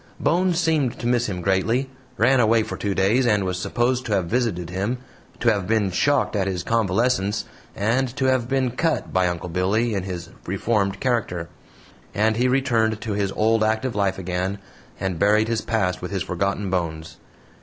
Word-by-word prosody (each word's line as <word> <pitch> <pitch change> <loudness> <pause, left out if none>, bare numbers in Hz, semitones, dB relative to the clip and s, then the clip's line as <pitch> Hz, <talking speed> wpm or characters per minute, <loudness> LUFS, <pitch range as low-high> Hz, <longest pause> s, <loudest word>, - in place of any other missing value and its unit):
Bones 180 0 +2
seemed 155 -7 +1
to - - -7
miss 120 0 +2
him 90 -3 -4
greatly, 100 +8 +1 0.3
ran 125 +4 +4
away 115 -1 +4
for - - -5
two 100 -2 -2
days, 110 +7 +3
and 105 -3 +3
was 90 -1 -2
supposed 125 +5 0
to 110 - 0
have 95 -3 +1
visited 90 -5 -1
him, 100 +7 -1 0.4
to 115 -2 +3
have 100 -3 -3
been 105 -3 +1
shocked 145 +6 +1
at 95 -2 0
his 90 -2 -2
convalescence, 110 -1 +1 0.3
and 115 +6 +1
to 135 - -1
have 130 -2 +1
been 130 -2 +1
"cut" 160 +6 -1
by 95 -1 +3
Uncle 90 0 -3
Billy 100 +7 +1
in 100 - -1
his 90 -2 -6 0.2
reformed 100 0 0
character; 100 -10 -1 0.7
and 110 +2 +2
he 125 +2 +3
returned 120 -5 +1
to 110 -3 -3
his 100 -1 -1
old 110 +1 +2
active 110 +3 0
life 100 -2 0
again, 95 +1 -2 0.4
and 95 -4 -2
buried 105 +3 +3
his 115 -1 0
past 90 -5 -1
with 90 - -4
his 95 -2 -2
forgotten 100 +2 -2
bones. 80 -3 -3
105 Hz, 185 wpm, -23 LUFS, 95-120 Hz, 0.7 s, ran